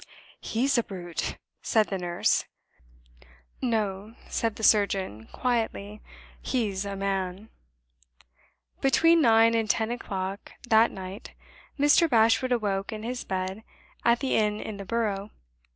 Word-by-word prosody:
"He's 255 +3 +1
a - - 0
brute!" 175 -5 -5 0.2
said 220 -2 +2
the 195 - -2
nurse. 175 -1 +1 1.2
"No," 215 -2 -2
said 225 -2 -1
the 220 - -8
surgeon, 195 - +2
quietly. 220 -4 -2 0.4
"He's 205 -6 -1
a 200 0 -4
man." 195 +1 -3 1.3
Between 330 +5 +4
nine 225 -3 +5
and 225 -2 0
ten 220 +2 +1
o'clock 195 -4 -5
that 225 0 +5
night, 190 +1 -9 0.4
Mr. 295 +4 +4
Bashwood 230 +1 +3
awoke 205 -5 0
in 215 -1 -6
his 245 +2 -4
bed 190 +2 -3 0.4
at 235 +1 +3
the 270 - 0
inn 210 -1 +1
in 215 -2 -6
the 200 - -7
Borough. 210 -2 -2
215 Hz, 125 wpm, -27 LUFS, 195-235 Hz, 1.3 s, nine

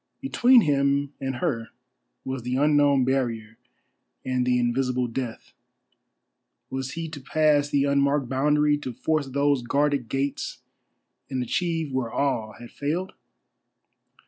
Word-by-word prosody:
Between 255 -2 +5
him 140 -2 +1
and 135 -1 -2
her 120 -6 -2 0.6
was 130 -1 -3
the 125 +2 -2
unknown 145 -2 +3
barrier 115 -4 -1 0.7
and 125 -1 0
the 125 0 +3
invisible 125 +1 0
Death. 120 -1 -5 1.2
Was 130 0 -4
he 165 0 -4
to 150 -3 -8
pass 145 +1 +2
the 140 -1 +2
unmarked 140 -1 +2
boundary, 150 +3 +2
to 130 -4 -6
force 150 +4 -1
those 140 0 +1
guarded 140 0 0
gates 135 +1 -2 0.7
and 130 -2 -2
achieve 165 +3 -1
where 130 -3 -1
all 115 -6 -1
had 120 0 -12
failed? 165 +6 -3
140 Hz, 125 wpm, -25 LUFS, 125-145 Hz, 1.2 s, Between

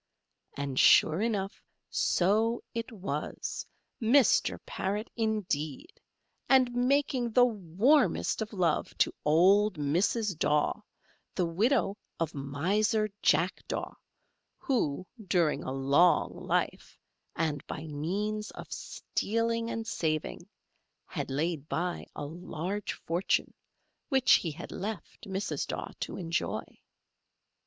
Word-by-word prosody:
And, 140 -2 -2
sure 160 +4 +6
enough, 205 -4 -1 0.3
so 220 +6 +2
it 230 +1 -4
was, 180 -9 -4 0.3
Mr. 245 +4 +4
Parrot, 205 +4 -3
indeed, 215 - -2 0.5
and 255 -2 +5
making 255 0 +1
the 245 +1 +7
warmest 225 - +2
of 220 - -3
love 175 -6 0
to - - +2
old 185 +5 +4
Mrs. 180 +8 +1
Daw, 150 +8 +1 0.5
the 180 - +1
widow 205 +5 +1 0.2
of 165 -2 -1
Miser 200 - 0
Jack - - +2
Daw, - - -3 0.6
who, 225 - -1 0.2
during 170 -4 +2
a - - -4
long 140 +6 +3
life, - - -2 0.4
and 155 -3 -1
by 155 - -5
means 200 +9 -2
of - - -7
stealing 230 +1 -2
and 225 -1 -3
saving, 155 -8 -2 0.6
had - - -5
laid 150 +2 -2
by 175 +1 -2
a 145 - -4
large 175 +5 -4
fortune, 170 +3 -1 0.6
which 265 -3 +3
he 170 - +3
had 160 +3 -8
left 205 0 -6
Mrs. 190 +2 -2
Daw - - -4
to - - -4
enjoy. 170 -2 -2
190 Hz, 110 wpm, -30 LUFS, 160-225 Hz, 0.6 s, the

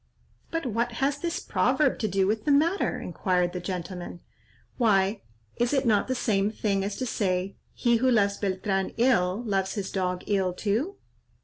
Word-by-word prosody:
'" - - -36 0.2
"But 330 -2 -2
what 235 0 -1
has 275 +4 0
this 340 +2 -2
proverb 295 -4 +1
to 220 - 0
do 195 -1 +1
with 215 +2 -1
the 295 - +3
matter?" 325 +7 +2
inquired 180 -3 0
the 180 - -3
gentleman. 180 -1 -5 0.6
"Why, 200 -3 +2 0.4
is 240 +3 +1
it 270 -1 +2
not 215 -3 +3
the 260 - -1
same 205 -5 +1
thing 200 -3 -1
as 200 +1 -3
to 260 - -3
say, 190 -4 -1 0.2
'He 235 -1 +3
who 260 +3 +2
loves 200 -4 +3
Beltran 195 0 -1
ill, 230 -4 +2
loves 195 -2 0
his 200 -3 -3
dog 180 -2 -1
ill 190 -3 +1
too?' 225 - -1
205 Hz, 180 wpm, -27 LUFS, 190-245 Hz, 0.6 s, the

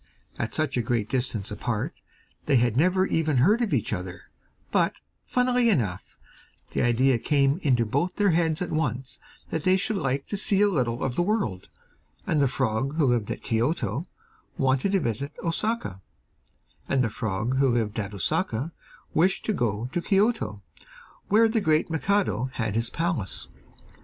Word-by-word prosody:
At - - -2
such 155 -4 0
a - - +2
great 115 -2 -1
distance 120 -6 -2
apart, - - -2 0.5
they 145 - +4
had 120 -2 +3
never 185 +6 +3
even 155 -6 +1
heard 205 - +4
of 230 - 0
each - - 0
other; - - -6 0.4
but, - - +2 0.3
funnily 250 -1 +2
enough, 110 - -1 0.5
the - - 0
idea 120 +1 +3
came 140 +3 +2
into 125 -6 +2
both 145 +11 -1
their 205 -2 +3
heads 165 0 +1
at 180 - -5
once 130 -4 -2 0.3
that 160 - -2
they 185 0 +4
should 200 +2 -1
like 140 -4 -1
to 205 - -2
see 195 -1 +2
a - - +5
little 125 -9 -1
of 135 - -1
the - - +2
world, 175 - -1 0.6
and 155 -3 +1
the 140 - +4
frog 130 +2 -1
who 160 -3 +3
lived 115 -4 -1
at - - -5
Kioto 125 +2 0 0.5
wanted 135 +8 +1
to 195 - +4
visit 140 - -2
Osaka, 165 - -1 0.9
and 135 -2 +2
the 115 - 0
frog 110 +5 -2
who 135 -2 +3
lived 110 -2 -1
at 100 -1 -3
Osaka 110 - -1 0.4
wished 185 +5 +2
to 215 - +1
go 115 - -1
to 175 - -1
Kioto, 195 - +1 0.6
where 225 +3 +5
the 225 0 0
great 155 -2 +2
Mikado 160 - +1
had 110 -4 -2
his 115 +1 0
palace. 165 - -2
140 Hz, 165 wpm, -26 LUFS, 115-180 Hz, 0.9 s, a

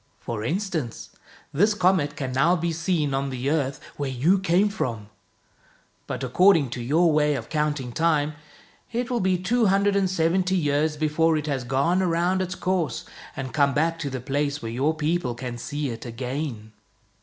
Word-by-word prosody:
For 110 -2 -5
instance, 155 - -3 0.4
this 205 +8 +3
comet 180 -7 +2
can 135 -4 -4
now 135 +8 +3
be 170 -1 -1
seen 165 -4 0
on 135 +1 -1
the 130 +2 -2
earth 140 -3 0 0.2
where 140 -2 -2
you 150 +10 +2
came 190 +2 +3
from. 115 - -4 1.0
But - - -4
according 155 +1 +4
to 125 - -4
your 160 +7 +3
way 150 -1 +2
of 115 -4 -6
counting 150 -5 -1
time, 155 +1 +1 0.6
it 240 +1 -2
will 245 - +1
be 185 -2 +2
two 225 +5 +1
hundred 200 +1 +3
and 195 -2 +2
seventy 185 +2 +1
years 150 -1 +1
before 155 +1 +2
it 150 - -3
has 140 -4 -2
gone 140 +9 +1
around 180 +1 +1
its 180 -1 -3
course 180 -4 -1 0.3
and 130 -1 -5
come 140 -2 +2
back 165 +2 +1
to 145 - -3
the 130 -1 -4
place 145 +3 -1
where 115 -3 -5
your 140 +7 0
people 155 -5 -1
can 120 -1 -6
see 145 +3 -3
it 115 -1 -6
again." 125 -1 -5
150 Hz, 180 wpm, -25 LUFS, 135-180 Hz, 1.0 s, according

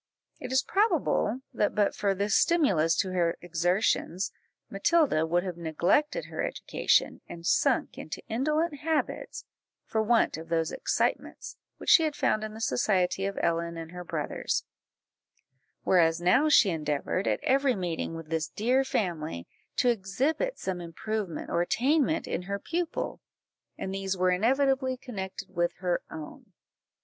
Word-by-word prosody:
It - - -6
is 260 0 +3
probable 385 - +1
that 210 - 0
but 205 -1 +2
for 200 -1 0
this 200 +1 0
stimulus 195 - +3
to 190 - -4
her 170 -2 +1
exertions, 175 +1 0 0.4
Matilda 200 - +2
would 175 +2 +1
have 180 -3 -5
neglected 175 - +1
her - - -5
education, - - +1
and 170 0 -9
sunk - - +1
into - - -7
indolent 300 +6 0
habits, 315 0 -2 0.4
for 220 - 0
want 225 -5 +2
of 165 +1 -9
those 165 -1 0
excitements - - -2 0.2
which - - 0
she - - +8
had 310 -2 0
found 215 -6 +1
in 215 0 -6
the 220 - -8
society 195 -5 +1
of 200 - -5
Ellen 170 0 0
and 165 0 -7
her 180 0 -7
brothers; 165 -4 -2 1.2
whereas 165 -3 +3
now 250 - +4
she 210 -9 +6
endeavoured, 155 +3 -1
at - - +1
every 270 -1 +3
meeting 175 -3 -3
with 165 -1 -8
this 160 -1 -1
dear 250 +5 +1
family, 160 - -2 0.3
to 250 - +3
exhibit 255 - 0
some 185 -2 -3
improvement 190 +1 -4
or 170 - +2
attainment 285 - +1
in - - -2
her 200 +2 -3
pupil, 335 - -3 0.6
and 190 - -4
these 195 -1 -2
were 185 0 +3
inevitably 260 +6 +2
connected 195 -8 -7
with 175 0 +1
her 180 -1 -1
own. 155 -2 -10
195 Hz, 150 wpm, -28 LUFS, 170-260 Hz, 1.2 s, she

